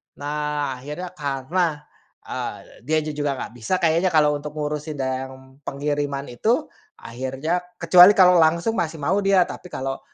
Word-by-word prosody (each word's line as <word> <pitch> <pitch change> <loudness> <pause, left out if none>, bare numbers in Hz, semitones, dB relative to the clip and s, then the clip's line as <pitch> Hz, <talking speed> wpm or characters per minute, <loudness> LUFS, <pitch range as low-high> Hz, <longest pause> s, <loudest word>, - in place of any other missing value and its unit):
Nah, 145 -2 -3
akhirnya 150 +7 -7
karena, 150 +1 -2 0.4
eee, - - -5 0.3
dianya 155 -1 0
juga 145 -2 -2
nggak - - -6
bisa 120 +10 -1
kayaknya 165 +3 +3
kalau 155 -3 +4
untuk 150 +1 -8
ngurusin 150 0 -3
dan 130 0 -5
pengiriman 145 0 -2
itu, 230 - 0 0.2
akhirnya 135 +8 -3 0.2
kecuali 180 +4 +7
kalau 180 -2 +6
langsung 170 +7 +3
masih 165 -1 -2
mau 190 +8 +1
dia, 195 -2 +4
tapi 180 - -9
kalau 135 -4 -4
150 Hz, 140 wpm, -23 LUFS, 140-175 Hz, 0.4 s, kecuali